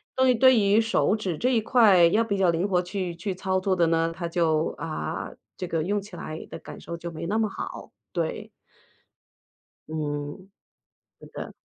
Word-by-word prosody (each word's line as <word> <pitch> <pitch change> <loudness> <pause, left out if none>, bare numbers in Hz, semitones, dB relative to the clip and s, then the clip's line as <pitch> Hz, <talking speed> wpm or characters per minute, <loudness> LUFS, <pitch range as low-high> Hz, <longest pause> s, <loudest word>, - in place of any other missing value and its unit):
对 260 -1 +4
对 260 +1 +6
于 205 +1 +4
手 225 -1 +2
指 185 -7 -3
这 250 - +1
一 240 - +3
块 210 -6 +5
要 215 +7 +3
比 200 -3 -1
较 190 -2 +3
灵 170 +4 0
活 180 -2 +3
去 180 -1 -4
去 185 +3 -3
操 190 0 -1
作 185 0 +1
的 170 -2 +3
呢， 165 0 +1
他 170 -1 -3
就， 165 -2 +1
啊， 155 - -4 0.3
这 180 - -4
个 165 -2 -1
用 205 +4 0
起 205 +2 -11
来 155 +1 -7
的 - - -6
感 - - -10
受 170 - -6
就 170 0 -6
没 165 +1 -6
那 210 +6 0
么 220 -1 +1
好， - - -7 0.2
对。 - - -3 1.4
嗯， 150 +3 -4 0.7
是 - - -12
的。 - - -7
185 Hz, 200 characters per minute, -26 LUFS, 165-210 Hz, 1.4 s, 对